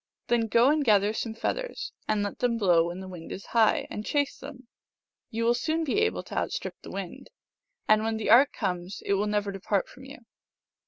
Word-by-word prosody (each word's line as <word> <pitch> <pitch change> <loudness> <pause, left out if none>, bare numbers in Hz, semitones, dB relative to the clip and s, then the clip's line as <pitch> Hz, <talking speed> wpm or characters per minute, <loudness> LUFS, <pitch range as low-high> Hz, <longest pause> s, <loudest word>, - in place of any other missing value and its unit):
" - - -58
Then 235 -2 +2
go 235 +5 +4
and 305 -1 +2
gather 210 -3 +3
some 225 0 -4
feathers, - - -3
and 210 -1 +1
let 205 - -5
them 240 -2 +1
blow 175 -6 +4
when 175 +2 -6
the 190 - -8
wind 175 -3 -9
is 195 - -7
high, 225 -2 +3
and 210 - -4
chase 285 +4 0
them. 265 -2 -10 0.6
You 230 +1 -2
will 235 +1 +4
soon 315 +7 -1
be 315 +7 0
able 440 0 0
to - - -3
out - - -2
strip - - -4
the - - -10
wind, - - -7 0.6
and 215 0 +5
when 225 0 -1
the 220 - 0
art 260 +5 +7
comes 180 -1 -4
it - - +1
will 200 +2 +1
never 205 -1 0
depart 195 0 -1
from 260 +1 -14
you." 275 +2 -10
220 Hz, 220 wpm, -27 LUFS, 200-260 Hz, 0.6 s, art